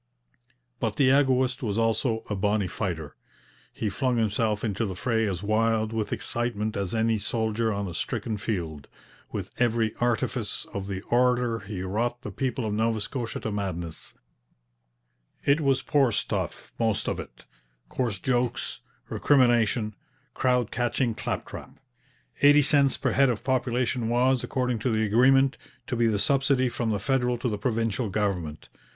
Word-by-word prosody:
But -, -, -1 dB
the 130 Hz, -2 st, +4 dB
egoist 130 Hz, -2 st, +2 dB
was 105 Hz, -4 st, -2 dB
also 115 Hz, 0 st, +1 dB
'a 105 Hz, -, -2 dB
bonny 100 Hz, +1 st, +1 dB
fighter.' 85 Hz, -6 st, -4 dB, 0.6 s
He 110 Hz, -, -3 dB
flung 125 Hz, +5 st, 0 dB
himself 110 Hz, -1 st, 0 dB
into 110 Hz, -1 st, -1 dB
the 95 Hz, -4 st, -3 dB
fray 115 Hz, +2 st, 0 dB
as 95 Hz, -1 st, -3 dB
wild 110 Hz, +1 st, +1 dB
with 110 Hz, -2 st, -2 dB
excitement 115 Hz, -2 st, -1 dB
as 100 Hz, +2 st, -2 dB
any 110 Hz, -1 st, +2 dB
soldier 110 Hz, +1 st, 0 dB
on 100 Hz, -1 st, -2 dB
a 90 Hz, -, -6 dB
stricken 110 Hz, +6 st, -2 dB
field. 85 Hz, -9 st, -4 dB, 0.4 s
With -, -, -5 dB
every 115 Hz, -2 st, +2 dB
artifice 120 Hz, -2 st, -1 dB
of 100 Hz, -1 st, -4 dB
the 95 Hz, -1 st, -4 dB
orator 125 Hz, -1 st, +2 dB
he 100 Hz, -2 st, -6 dB
wrought 120 Hz, +6 st, -2 dB
the 105 Hz, -, -5 dB
people 130 Hz, +1 st, -2 dB
of 105 Hz, -, -1 dB
Nova 110 Hz, +1 st, +1 dB
Scotia 115 Hz, +2 st, -4 dB
to 110 Hz, -, -3 dB
madness. 90 Hz, -5 st, -4 dB, 1.3 s
It 145 Hz, +3 st, +4 dB
was 135 Hz, -2 st, +2 dB
poor 135 Hz, -4 st, +3 dB
stuff, -, -, -3 dB
most 110 Hz, -3 st, 0 dB
of -, -, -1 dB
it; -, -, -10 dB, 0.4 s
coarse 120 Hz, -6 st, -2 dB
jokes, 120 Hz, +3 st, -1 dB, 0.3 s
recrimination, 120 Hz, -5 st, +3 dB, 0.4 s
crowd 125 Hz, -3 st, +1 dB
catching 120 Hz, 0 st, 0 dB
claptrap. -, -, -5 dB, 0.6 s
Eighty 145 Hz, +1 st, +7 dB
cents 140 Hz, -1 st, +4 dB
per 130 Hz, -2 st, 0 dB
head 135 Hz, +3 st, +4 dB
of 120 Hz, -, -2 dB
population 125 Hz, -2 st, 0 dB
was, 125 Hz, +1 st, +2 dB
according 125 Hz, -3 st, -1 dB
to 115 Hz, -, 0 dB
the 110 Hz, -1 st, +1 dB
agreement, 135 Hz, +5 st, +4 dB, 0.3 s
to 125 Hz, -, -3 dB
be 115 Hz, -1 st, +3 dB
the 110 Hz, -2 st, +1 dB
subsidy 135 Hz, +3 st, +2 dB
from 120 Hz, -1 st, -2 dB
the 105 Hz, -2 st, 0 dB
federal 125 Hz, +1 st, +1 dB
to 120 Hz, -, -2 dB
the 105 Hz, -2 st, -3 dB
provincial 115 Hz, 0 st, -1 dB
government. 90 Hz, -7 st, -2 dB
115 Hz, 155 wpm, -26 LUFS, 105-125 Hz, 1.3 s, Eighty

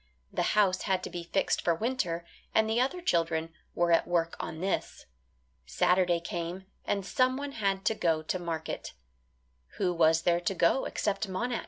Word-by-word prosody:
The -, -, 0 dB
house 190 Hz, -3 st, +4 dB
had 190 Hz, -1 st, +1 dB
to -, -, -5 dB
be 175 Hz, -1 st, -5 dB
fixed 195 Hz, +3 st, +1 dB
for 170 Hz, -, +2 dB
winter, 180 Hz, -6 st, -1 dB, 0.3 s
and 220 Hz, 0 st, +4 dB
the 225 Hz, +2 st, +2 dB
other 315 Hz, +8 st, -1 dB
children 165 Hz, -, 0 dB, 0.2 s
were 175 Hz, 0 st, +2 dB
at 165 Hz, -, +4 dB
work 170 Hz, -1 st, +1 dB
on 160 Hz, -, -5 dB
this. 190 Hz, +3 st, -2 dB, 0.6 s
Saturday 180 Hz, -2 st, +3 dB
came 170 Hz, +2 st, -5 dB, 0.2 s
and 200 Hz, -2 st, -1 dB
someone 255 Hz, +7 st, +1 dB
had 195 Hz, -5 st, -1 dB
to -, -, +3 dB
go 165 Hz, -6 st, +1 dB
to 185 Hz, +4 st, -2 dB
market. 165 Hz, -2 st, -4 dB, 0.8 s
Who 180 Hz, -3 st, +1 dB
was 165 Hz, -1 st, +4 dB
there 175 Hz, -1 st, +3 dB
to 190 Hz, +2 st, -1 dB
go 170 Hz, +10 st, +3 dB
except 205 Hz, 0 st, -1 dB
Monax? 235 Hz, +5 st, -1 dB
180 Hz, 170 wpm, -30 LUFS, 170-210 Hz, 0.8 s, house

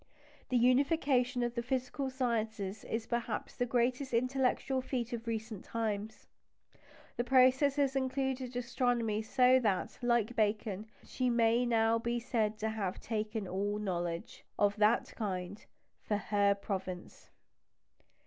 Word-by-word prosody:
The 255 Hz, -, +2 dB
unification 255 Hz, 0 st, +3 dB
of 240 Hz, 0 st, -1 dB
the 235 Hz, -, -2 dB
physical 260 Hz, +2 st, -2 dB
sciences 220 Hz, -6 st, -2 dB
is 225 Hz, 0 st, -3 dB
perhaps 235 Hz, -2 st, -3 dB
the 245 Hz, -, -1 dB
greatest 250 Hz, +2 st, 0 dB
intellectual 260 Hz, +1 st, +1 dB
feat 250 Hz, -2 st, -3 dB
of 235 Hz, 0 st, -5 dB
recent 220 Hz, -3 st, -4 dB
times. 220 Hz, -2 st, -3 dB, 0.9 s
The 240 Hz, -, +1 dB
process 260 Hz, +2 st, +4 dB
has 275 Hz, -2 st, +1 dB
included 260 Hz, -1 st, -1 dB
astronomy; 240 Hz, -3 st, 0 dB
so 250 Hz, +3 st, +4 dB
that, 210 Hz, -6 st, -1 dB
like 240 Hz, -1 st, +1 dB
Bacon, 210 Hz, -1 st, 0 dB, 0.2 s
she 255 Hz, -1 st, -1 dB
may 235 Hz, +1 st, +3 dB
now 225 Hz, -1 st, +3 dB
be 235 Hz, +1 st, -1 dB
said 220 Hz, -3 st, -1 dB
to 220 Hz, -, 0 dB
have 200 Hz, -4 st, -3 dB
"taken 215 Hz, -2 st, -3 dB
all 200 Hz, +3 st, -1 dB
knowledge" 175 Hz, -4 st, -3 dB
(of 205 Hz, 0 st, +3 dB
that 215 Hz, +3 st, +2 dB
kind) 190 Hz, -1 st, -4 dB, 0.4 s
"for 210 Hz, -, -1 dB
her 205 Hz, -1 st, +2 dB
province." 190 Hz, -3 st, -6 dB
235 Hz, 130 wpm, -33 LUFS, 210-255 Hz, 0.9 s, process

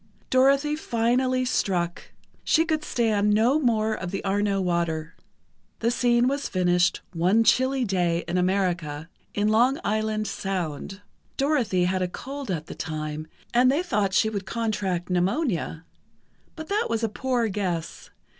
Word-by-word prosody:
Dorothy 275 Hz, +3 st, +4 dB
finally 255 Hz, -1 st, +1 dB
struck: 175 Hz, -8 st, -1 dB, 0.3 s
she 325 Hz, -, +3 dB
could 310 Hz, -1 st, -1 dB
stand 215 Hz, -6 st, +1 dB
no 240 Hz, +7 st, +3 dB
more 220 Hz, -5 st, +1 dB
of 185 Hz, -4 st, -4 dB
the 195 Hz, -, -4 dB
Arno 200 Hz, 0 st, +1 dB
water. 170 Hz, -3 st, -1 dB, 0.6 s
The 230 Hz, +1 st, 0 dB
scene 240 Hz, 0 st, +3 dB
was 280 Hz, +1 st, -1 dB
finished 175 Hz, -1 st, +2 dB
one 185 Hz, +7 st, +3 dB
chilly 260 Hz, +2 st, +3 dB
day 175 Hz, -4 st, 0 dB
in 175 Hz, -, -2 dB
America—in 180 Hz, 0 st, -1 dB
Long 245 Hz, +7 st, +3 dB
Island 215 Hz, 0 st, 0 dB
Sound. 195 Hz, -2 st, -4 dB, 0.4 s
Dorothy 260 Hz, -11 st, +1 dB
had 185 Hz, +1 st, 0 dB
a 180 Hz, -, +1 dB
cold 275 Hz, +7 st, -7 dB
at 160 Hz, -4 st, -2 dB
the -, -, -8 dB
time, 155 Hz, 0 st, -5 dB, 0.3 s
and 250 Hz, +2 st, +5 dB
they 300 Hz, +6 st, +1 dB
thought 205 Hz, -, 0 dB
she 220 Hz, 0 st, +3 dB
would 200 Hz, -3 st, -4 dB
contract 205 Hz, -6 st, -2 dB
pneumonia. 180 Hz, -, -1 dB, 0.7 s
But 315 Hz, -1 st, -8 dB
that 420 Hz, +4 st, +1 dB
was 230 Hz, 0 st, -1 dB
a -, -, +3 dB
poor 245 Hz, +1 st, -1 dB
guess. 185 Hz, -5 st, -3 dB
210 Hz, 145 wpm, -25 LUFS, 180-250 Hz, 0.7 s, and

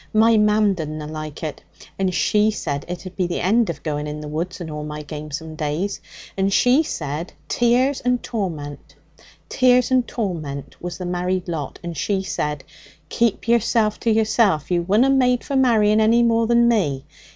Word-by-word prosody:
'My 225 Hz, +1 st, +5 dB
mam 210 Hz, -1 st, +3 dB
didna 155 Hz, -3 st, -5 dB
like 155 Hz, 0 st, -7 dB
it. 155 Hz, -2 st, -5 dB, 0.4 s
And 190 Hz, -1 st, +1 dB
she 210 Hz, +6 st, +2 dB
said 145 Hz, -9 st, -3 dB
it'd 180 Hz, +1 st, -7 dB
be 185 Hz, -2 st, 0 dB
the 175 Hz, -, -3 dB
end 220 Hz, +4 st, +2 dB
of 170 Hz, -, -5 dB
going 150 Hz, -1 st, -3 dB
in 150 Hz, 0 st, -5 dB
the 150 Hz, -, -7 dB
woods 165 Hz, +6 st, -4 dB
and 165 Hz, -3 st, -6 dB
all 150 Hz, 0 st, -5 dB
my 150 Hz, 0 st, -6 dB
gamesome 155 Hz, +2 st, -7 dB
days. 155 Hz, +6 st, -3 dB, 0.3 s
And 195 Hz, 0 st, +1 dB
she 250 Hz, +8 st, +4 dB
said 155 Hz, -, -4 dB
tears 250 Hz, +3 st, +2 dB
and 250 Hz, 0 st, 0 dB
torment, 155 Hz, -, -5 dB, 0.5 s
tears 250 Hz, -1 st, +3 dB
and 255 Hz, -2 st, +3 dB
torment 155 Hz, -, -4 dB
was 175 Hz, 0 st, -5 dB
the 180 Hz, -, -6 dB
married 180 Hz, +1 st, -2 dB
lot. 160 Hz, -5 st, -4 dB
And 170 Hz, -1 st, -5 dB
she 195 Hz, +5 st, -1 dB
said, 150 Hz, -6 st, -3 dB, 0.5 s
"Keep 230 Hz, -2 st, 0 dB
yourself 230 Hz, -2 st, +2 dB
to 230 Hz, -, 0 dB
yourself. 215 Hz, -, +2 dB
You 175 Hz, -1 st, +2 dB
wunna 210 Hz, +10 st, +3 dB
made 250 Hz, -2 st, +2 dB
for 280 Hz, -, -4 dB
marrying 220 Hz, -5 st, +4 dB
any 230 Hz, +2 st, +4 dB
more 230 Hz, -1 st, +2 dB
than 235 Hz, 0 st, +4 dB
me. 155 Hz, -, +1 dB
185 Hz, 175 wpm, -21 LUFS, 155-230 Hz, 0.5 s, My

